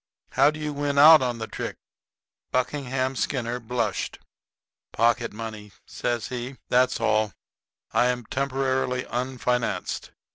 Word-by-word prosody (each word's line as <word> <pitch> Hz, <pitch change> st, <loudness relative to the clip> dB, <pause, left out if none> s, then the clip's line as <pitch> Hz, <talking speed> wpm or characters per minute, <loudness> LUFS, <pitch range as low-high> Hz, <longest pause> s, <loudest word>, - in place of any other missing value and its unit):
How 135 Hz, +2 st, +5 dB
do 155 Hz, +1 st, -5 dB
you 150 Hz, -1 st, -3 dB
win 145 Hz, 0 st, -1 dB
out 155 Hz, +2 st, +9 dB
on 125 Hz, -2 st, -1 dB
the 110 Hz, -, -4 dB
trick?" -, -, -5 dB, 0.8 s
Buckingham 130 Hz, 0 st, -1 dB
Skinner 125 Hz, -2 st, -1 dB
blushed. 125 Hz, +1 st, -2 dB, 0.7 s
"Pocket 120 Hz, +1 st, +2 dB
money," 110 Hz, -2 st, -7 dB
says 120 Hz, -2 st, -2 dB
he; 125 Hz, +1 st, -5 dB
"that's 125 Hz, +1 st, +3 dB
all. 110 Hz, -1 st, +2 dB, 0.6 s
I 125 Hz, -, +3 dB
am 125 Hz, -1 st, -1 dB
temporarily 130 Hz, -1 st, 0 dB
unfinanced. 125 Hz, 0 st, -2 dB
125 Hz, 120 wpm, -25 LUFS, 120-135 Hz, 0.8 s, out